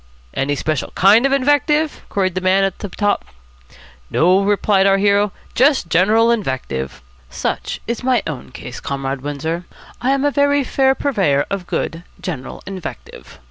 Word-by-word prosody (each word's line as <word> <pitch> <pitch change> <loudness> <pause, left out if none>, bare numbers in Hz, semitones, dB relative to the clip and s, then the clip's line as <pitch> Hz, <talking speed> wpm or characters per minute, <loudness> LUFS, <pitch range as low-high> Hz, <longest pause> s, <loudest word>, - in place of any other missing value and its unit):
'Any 140 +2 0
special 155 -1 -2
kind 215 +7 +5
of - - -3
invective?' 290 +3 +2
queried 190 -2 0
the 185 - -2
man 190 +1 +3
up 195 0 -3
top. 205 -1 +1 0.9
'No,' 180 +4 +3
replied 200 -1 +2
our 195 0 +4
hero, 200 0 +3 0.2
'just 265 - +3
general 220 +6 +4
invective.' 130 - -3 0.3
Such - - -3
is 235 0 -3
my 255 -1 +2
own 150 -6 -6
case, 125 -1 -8
Comrade 135 -1 -3
Windsor. 160 +5 -3 0.4
I 250 - 0
am 275 +1 +2
a 290 - +3
very 285 0 +2
fair 265 0 +2
purveyor 190 - +1
of 195 -3 -3
good, 165 - -3 0.2
general 140 -8 -6
invective. 190 -2 -8
195 Hz, 150 wpm, -19 LUFS, 160-250 Hz, 0.9 s, kind